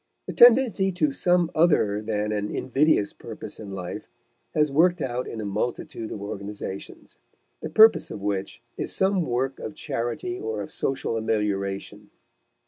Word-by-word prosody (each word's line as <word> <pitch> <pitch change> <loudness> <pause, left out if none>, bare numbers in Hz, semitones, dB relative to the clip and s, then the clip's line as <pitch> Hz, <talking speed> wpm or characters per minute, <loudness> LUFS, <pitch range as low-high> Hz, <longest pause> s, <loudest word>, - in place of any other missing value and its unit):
The - - -5
tendency 235 -5 +6
to 155 -5 +1
some 175 +3 +2
other 110 -11 +3
than 105 -1 -2
an 105 -1 -2
invidious 135 -5 +1
purpose - - -9
in 105 -2 -8
life 90 -2 -6 0.5
has 150 -2 +2
worked 175 +5 +3
out 125 -3 -3
in 115 - -6
a 110 - -4
multitude 110 +2 -3
of 100 - -6
organizations, 100 -8 -7 0.4
the - - -4
purpose 220 0 +6
of - - -6
which 100 +2 -3
is - - -3
some 190 0 +2
work 130 -2 -1
of 155 - -6
charity 135 +6 -3
or 110 -2 -3
of - - -10
social 135 -4 -2
amelioration. 105 -1 -2
115 Hz, 150 wpm, -25 LUFS, 105-160 Hz, 0.5 s, tendency